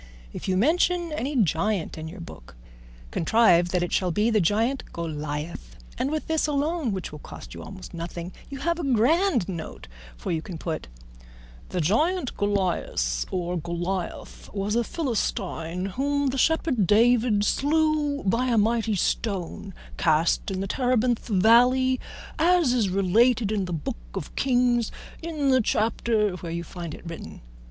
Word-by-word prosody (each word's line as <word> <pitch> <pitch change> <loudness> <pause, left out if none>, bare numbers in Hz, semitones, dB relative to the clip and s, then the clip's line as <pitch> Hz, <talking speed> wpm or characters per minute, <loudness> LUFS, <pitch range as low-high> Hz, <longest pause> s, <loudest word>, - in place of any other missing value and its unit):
If - - -6
you 185 -1 +1
mention 340 - +2
any 295 -1 -2
giant 200 - +1
in 160 0 -6
your 175 +3 -9
book - - -11 0.6
contrive 175 -2 +4
that 180 0 +1
it 175 - -3
shall 185 - +2
be 210 +6 +1
the 215 -2 +3
giant 225 +9 +1
Goliath, 155 -1 -5 0.2
and 255 +3 -1
with 310 0 -2
this 320 -1 +1
alone, 295 -2 0
which 190 -2 -4
will 150 - -9
cost - - -10
you - - -8
almost 190 -2 -10
nothing, 170 +1 -6 0.2
you 275 - -6
have 340 +3 0
a - - -3
grand 280 - +3
note, 170 -5 -6 0.3
for - - -4
you 160 -2 0
can 170 0 -7
put 160 - -4 0.8
The 180 - -1
giant 295 - +1
Golias 180 - 0
or 180 -1 -2
Goliath 175 +2 -4
was 200 +1 -2
a 235 - +2
Philistine 190 - -2
whom 280 +7 0
the 265 - -2
shepherd 295 - +2
David 225 0 +4
slew 300 +1 +1
by 230 +6 +1
a 235 -2 +2
mighty 225 0 +2
stone 185 - -2 0.3
cast 160 +6 +2
in 190 -1 -2
the 195 - -2
Terebinth 245 0 +1
valley, 245 +5 +4 0.4
as 340 -5 +4
is 225 -6 +2
related 210 +4 +3
in 205 -3 0
the 180 - -6
Book 160 - -3 0.2
of - - -6
Kings 245 -3 +2 0.3
in 310 -4 0
the 260 -1 +5
chapter 220 -1 +1
where 170 -1 -6
you 170 +1 -3
find 170 -2 -7
it - - -13
written. 165 -1 -8
215 Hz, 160 wpm, -25 LUFS, 175-260 Hz, 0.8 s, the